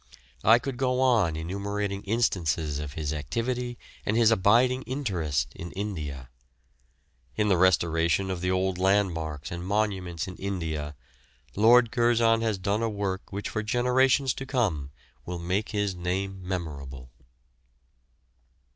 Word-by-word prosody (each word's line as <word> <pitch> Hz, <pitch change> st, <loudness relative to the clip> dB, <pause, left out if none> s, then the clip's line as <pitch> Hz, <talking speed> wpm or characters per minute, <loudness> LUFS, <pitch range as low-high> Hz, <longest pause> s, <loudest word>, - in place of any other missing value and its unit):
I 115 Hz, +3 st, +7 dB
could 130 Hz, +1 st, -5 dB
go 130 Hz, 0 st, +1 dB
on 115 Hz, -11 st, +3 dB
enumerating 100 Hz, +4 st, -3 dB
instances 85 Hz, -9 st, 0 dB
of 75 Hz, -2 st, -5 dB
his 75 Hz, -1 st, -3 dB
activity 120 Hz, -, -3 dB, 0.3 s
and 110 Hz, -, 0 dB
his 115 Hz, -1 st, +5 dB
abiding 120 Hz, +5 st, +4 dB
interest 95 Hz, -, -1 dB
in 85 Hz, 0 st, -7 dB
India. 75 Hz, -11 st, -5 dB, 1.1 s
In 105 Hz, -1 st, +1 dB
the 95 Hz, -, +4 dB
restoration 85 Hz, +1 st, +2 dB
of 90 Hz, -2 st, -4 dB
the 90 Hz, -, 0 dB
old 95 Hz, 0 st, 0 dB
landmarks 85 Hz, -7 st, 0 dB
and 85 Hz, 0 st, -5 dB
monuments 95 Hz, -3 st, -1 dB
in 90 Hz, -, -8 dB
India, 80 Hz, -6 st, -3 dB, 0.6 s
Lord 115 Hz, +2 st, +6 dB
Curzon 120 Hz, -2 st, +3 dB
has 110 Hz, -3 st, 0 dB
done 100 Hz, +3 st, -1 dB
a 115 Hz, -, +1 dB
work 100 Hz, -3 st, -3 dB
which 100 Hz, +1 st, -4 dB
for 110 Hz, -, -2 dB
generations 125 Hz, +4 st, +2 dB
to 135 Hz, -, -6 dB
come 95 Hz, -, 0 dB, 0.4 s
will 90 Hz, 0 st, -3 dB
make 90 Hz, +5 st, -1 dB
his 105 Hz, -2 st, -1 dB
name 95 Hz, +2 st, -3 dB
memorable. 70 Hz, -8 st, -5 dB
95 Hz, 135 wpm, -27 LUFS, 85-115 Hz, 1.1 s, I